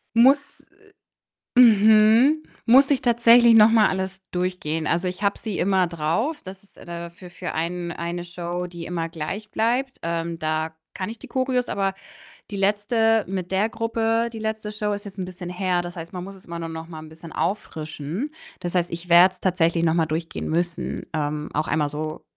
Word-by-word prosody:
Muss, 270 +5 +3 0.9
äh - - +10
mhm, 220 +6 +6 0.2
muss 265 +4 +6
ich 280 - +2
tatsächlich 235 0 +6
noch 215 0 +8
mal 225 -2 +5
alles 190 0 -3
durchgehen. 180 -3 -2
Also, 170 +2 0
ich 180 +2 -4
habe 200 0 +1
sie 215 -4 -4
immer 190 0 +2
drauf. 170 - -1
Das 190 +1 -10
ist 200 - -23
da - - -12
dafür 170 +1 -8
für 180 +1 -6
einen 170 +2 -3
eine 170 +1 -4
Show, 175 0 -4
die 170 -1 -8
immer 165 -1 -3
gleich 185 +7 -5
bleibt. 245 +5 0
Ähm, 170 0 -3
da 155 0 -2 0.2
kann 185 +1 -4
ich 230 - -8
die - - -12
Choreos, 255 -1 0
aber 195 -1 0 0.6
die 205 - -4
letzte 210 +2 +2
mit 185 -1 -4
der 195 +3 +2
Gruppe, 230 0 0
die 225 - -7
letzte 220 -1 -4
Show 210 0 -2
ist 205 0 -5
jetzt 200 -1 -10
'n 185 - -3
bisschen 180 -1 -8
her. 180 -1 0
Das 175 0 -7
heißt, 165 0 -8
man 180 -1 -5
muss 195 +1 -9
es 190 - -17
immer 170 0 -6
nur 165 -1 -5
noch 160 0 -7
mal 160 -2 -8
'n 155 - -11
bisschen 160 0 -12
auffrischen. 165 - -3 0.3
Das 175 0 -4
heißt, 175 -1 +1
ich 170 +1 -7
werde 175 +2 +7
es - - -14
tatsächlich 170 -2 +1
noch 160 - +3
mal 165 -2 +2
durchgehen 160 +1 -4
müssen. 170 +1 -2
Ähm, 150 -1 -2
auch 155 +1 -1
einmal 150 -1 0
so 155 +1 -5
185 Hz, 200 wpm, -23 LUFS, 170-220 Hz, 0.9 s, äh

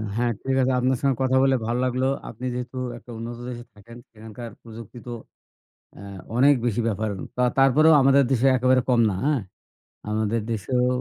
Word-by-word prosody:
হ্যাঁ, 120 0 +1
ঠিক 135 0 0
আছে 130 +1 +2
আপনার 130 0 +1
সঙ্গে 135 -2 +2
কথা 130 0 +2
বলে 135 -1 +3
ভালো 120 +2 -1
লাগলো 130 +1 0 0.2
আপনি 120 +3 -8
যেহেতু 125 +1 -6 0.2
একটা 120 - -13
উন্নত 115 +1 -6
দেশে 120 -1 -7
থাকেন 115 +3 -14
সেখানকার 110 +1 -10
প্রযুক্তি 115 0 -11
তো - - -5 0.9
আ - - -11 0.4
অনেক 140 +3 +5
বেশি 120 0 0
ব্যাপার 110 +1 -2 0.5
তারপরেও 150 +4 +5
আমাদের 135 0 +5
দেশে 130 0 +2
একেবারে 130 0 +3
কম 120 -2 +3
না, - - -2
হ্যাঁ, 145 -4 +1 0.7
আমাদের 110 +1 0
দেশেও 125 +4 0
125 Hz, 170 wpm, -24 LUFS, 115-130 Hz, 0.9 s, অনেক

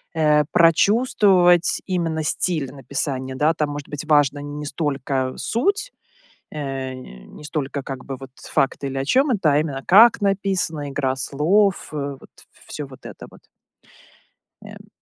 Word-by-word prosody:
э, 150 -2 +3
прочувствовать, 180 0 +4
именно, 165 -4 -1
стиль 155 -3 0
написания, 135 -1 -4
да. 150 +4 +2
Там, 150 -2 -2
может 145 -1 -7
быть, 150 +1 -6
важна 145 -2 +2
не 145 +1 -7
столько 135 -4 -2
суть, 405 - -1 0.6
э, 135 -3 -4
не 65 - -12
столько, 145 -2 -4
как 135 -1 -7
бы, 135 - -6
вот 135 -1 -11
с - - -12
факты 135 +1 0
или 135 0 -4
о 135 - -2
чём 265 - +2
это, 200 -9 +1
а 145 - +3
именно 145 -3 -3
как 225 +6 +7
написано, 190 -7 -1
игра 135 -1 -1
слов, 175 +10 +1
э, - - -5 0.2
вот - - -17 0.4
всё 150 - -6
вот 130 -1 -15
это - - -10
вот. - - -17 1.2
Эм. - - -13
150 Hz, 150 wpm, -21 LUFS, 135-175 Hz, 1.2 s, как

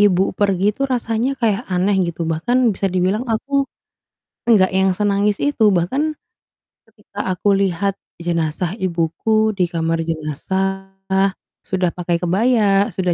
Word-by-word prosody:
ibu 190 -2 +3
pergi 200 0 +1
tuh 275 +5 -2
rasanya 245 +1 -1
kayak 225 -2 0
aneh 185 +2 +1 0.2
gitu 170 0 -4
bahkan 230 +10 +1
bisa 195 0 -1
dibilang 190 +7 0
aku 275 +5 0 0.8
enggak 190 -4 +4
yang 190 0 +3
senangis 200 +1 +1
itu, 250 -7 +3
bahkan 265 - 0 0.7
ketika 205 -3 -6
aku 195 +2 +2
lihat 195 0 0 0.2
jenazah 170 +1 -2
ibuku 195 +4 0
di 180 -3 0
kamar 165 -1 -1
jenazah 190 +5 -3 0.7
sudah 185 -2 -1
pakai 175 -1 -1
kebaya, 200 +2 +2
sudah 180 -2 -1
195 Hz, 130 wpm, -19 LUFS, 175-220 Hz, 0.8 s, enggak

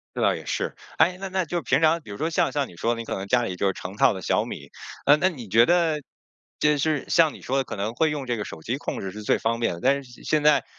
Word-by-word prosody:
这 - - -3
倒 - - +3
也 - - -7
是， - - -2 0.2
哎， 180 +1 +4
那 195 - -4
那 190 -1 0
就 170 +1 -3
平 - - +2
常 160 +1 +4
比 105 - -13
如 100 - -6
说 160 +2 -1
像 170 +1 +1
像 145 -2 -1
你 85 - -15
说 115 +8 0
你 115 - -5
可 - - -4
能 95 +1 -5
家 120 +1 +3
里 95 - -3
就 95 +1 +1
成 95 +2 -8
套 - - +5
的 95 - -6
小 - - +1
米， - - -8 0.4
呃， 145 +1 +7
那 185 +4 +2
你 125 - -8
觉 115 +4 +5
得 165 -4 +2 0.6
就 150 0 +3
是 150 -1 0
像 160 -3 +4
你 - - -12
说 135 - -1
的 135 - +1
可 110 - -6
能 105 +4 -3
会 160 +4 +2
用 145 -3 -4
这 120 - -1
个 105 - -3
手 80 - -9
机 120 +10 -2
控 - - -4
制 95 -1 -5
是 105 +1 -8
最 - - +2
方 115 +1 -1
便 115 -7 0
的。 85 - -9
但 140 +1 +2
是 125 -2 -15
现 155 -1 +1
在 150 -3 +4
135 Hz, 325 characters per minute, -25 LUFS, 110-155 Hz, 0.6 s, 呃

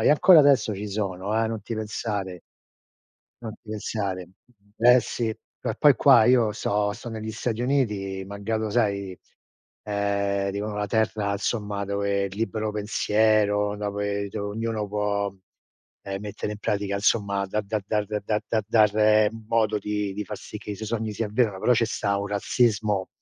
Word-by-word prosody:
E - - +4
ancora 160 +3 +7
adesso 140 -6 +4
ci 105 - -5
sono, 100 0 -3
eh! 110 - 0
Non 110 -2 -4
ti 115 - -5
pensare! 105 -4 -4 1.0
Non 110 -2 -5
ti 110 - -12
pensare. 100 -4 -3 0.5
Eh 125 +2 +6
sì! 115 0 -3
Eh 110 - -6
poi 145 -3 +6
qua 125 -6 +6
io 120 -3 +4
sto 105 -1 0
sto 120 +2 -8
negli 110 -1 -5
Stati 115 +1 -3
Uniti, 105 -8 0
malgrado 105 +2 -3
sai, 100 -5 0 0.6
ehm, 100 -1 -1
dicono 105 +1 -4
la 105 - -1
terra 110 -1 0
insomma 105 -1 -2
dove 100 0 0
il 95 0 -6
libero 110 -1 -2
pensiero 105 0 +2
dove 100 0 -2
do 100 +1 -4
ognuno 110 0 -2
può, 100 -1 -1 0.7
ehm, 95 0 -5
mettere 105 0 -5
in 105 - -8
pratica 100 -1 -1
insomma 100 -1 +1
da 105 +3 -1
da 105 +1 -2
dar 105 -1 0
da 105 -1 -3 0.3
da 110 -1 +1
dar 110 -1 +4 0.2
modo 110 -2 +2
di 105 -1 -2
di 105 - -4
far - - -6
sì - - -9
che - - -8
i - - -3
suoi 110 +1 -6
sogni 110 -1 -2
si 105 - -3
avverano 105 -2 0
però 125 - +4
ce 115 -1 +2
sta 100 -3 -1
un 100 - -3
razzismo 105 -1 +1
105 Hz, 170 wpm, -25 LUFS, 100-110 Hz, 1.0 s, ancora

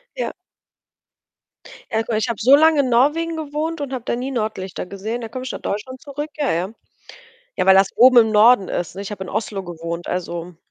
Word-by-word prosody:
Ja. - - -3 1.6
Ja 220 0 +1
guck, 225 - -3
ich 220 - 0
habe 230 - -3
so 260 +5 +7
lange 315 0 +5
in 260 - -1
Norwegen 305 +7 +2
gewohnt 310 +2 -3
und 280 -2 -4
habe 255 -3 -4
da - - -1
nie 255 +3 -4
Nordlichter 215 -7 -4
gesehen. 210 +6 -5
Da 225 - -6
komme 255 +3 -6
ich 260 - -4
nach - - -7
Deutschland 255 +6 -5
zurück 290 +2 -6
ja, 290 -3 0
ja. 175 +3 -1 0.9
Ja, - - +1
weil 190 - +8
das 195 0 +5
oben 255 +1 +7
im 220 -2 +5
Norden 215 -1 +5
ist, 175 -1 -3
ne? 195 - -7
Ich 200 - -7
habe 200 -2 -6
in - - -8
Oslo 210 -1 -3
gewohnt, 170 0 -6
also 175 -1 -4
230 Hz, 215 wpm, -20 LUFS, 190-270 Hz, 1.6 s, weil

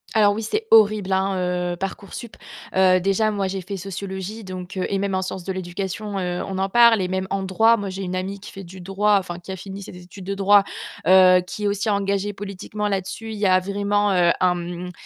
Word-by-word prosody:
Alors 205 -2 +5
oui, 220 - -3
c'est 425 - -2
horrible, 210 -3 +5
hein, 190 +1 +1 0.4
heu, - - -4
Parcoursup. 195 +5 -7 0.4
Heu, 185 -1 +4
déjà 195 +3 +2
moi, 200 -2 -1
j'ai 195 +1 -3
fait 195 +3 -6
sociologie 195 +2 -6
donc, 185 0 -7
heu, 185 - 0
et 195 - 0
même 200 0 -1
en 185 - 0
sciences 185 -1 -5
de 190 - -4
l'éducation, 190 +3 -4
heu, 180 -1 -2
on 190 - -4
en 195 0 0
parle 235 0 +6
et 180 - -2
même 190 0 -2
en 195 0 -1
droit. 220 +5 +4
Moi, 205 -3 -4
j'ai 190 +1 -5
une 185 0 -3
amie 190 +2 -4
qui 200 - -11
fait 195 - -8
du 185 +1 -11
droit, 200 +3 +2
enfin 175 -2 -6
qui 175 +2 -9
a 190 - -5
fini 195 +2 -8
ses 185 - -10
études 180 +2 -12
de 195 +2 -3
droit, 200 +1 +5 0.4
heu, 185 -1 +7
qui 210 +3 -5
est - - +3
aussi 205 +2 -1
engagée 200 0 0
politiquement 205 +1 -5
là-dessus. 200 +3 -3
Il - - -6
y 205 - 0
a 185 -1 +5
vraiment, 200 +1 0
heu, 175 -2 +4
un, 180 -1 +3
mmh, 175 +1 -6
195 Hz, 235 wpm, -22 LUFS, 185-205 Hz, 0.4 s, heu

